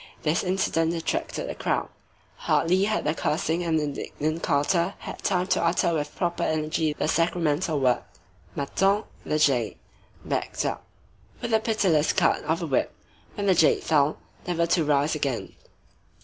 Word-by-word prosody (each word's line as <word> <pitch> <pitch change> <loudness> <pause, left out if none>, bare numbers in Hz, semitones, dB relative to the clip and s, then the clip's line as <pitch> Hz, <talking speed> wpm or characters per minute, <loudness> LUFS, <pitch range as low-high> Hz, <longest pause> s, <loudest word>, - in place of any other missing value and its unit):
This 155 +2 +1
incident 170 -3 +1
attracted 165 - -2
a - - -3
crowd. - - -1 0.6
Hardly 185 +4 +3
had 215 +1 0
the 150 - +1
cursing 160 +2 -1
and 165 -2 +1
indignant 155 +2 -3
carter 170 +6 +1
had - - -8
time 180 -2 +1
to - - +2
utter 170 0 +2
with 150 -2 -3
proper 175 -1 -1
energy 155 0 0
the 150 - -2
sacramental 165 -1 +1
word, 125 -2 +2 0.6
Mâtin 195 +9 +1 0.2
(the 155 - -1
jade), 130 -7 +2 0.5
backed - - -2
up - - -3 0.5
with 235 - -3
a 220 - +5
pitiless 195 -9 +2
cut 180 -4 +2
of 160 +3 0
the - - -2
whip, 140 -5 0 0.4
when 205 - -3
the 195 - +5
jade 160 -3 +3
fell, 150 -1 +2 0.3
never 170 -1 +1
to 170 0 +2
rise 145 0 +2
again. 140 -6 -2
165 Hz, 155 wpm, -26 LUFS, 150-180 Hz, 0.6 s, a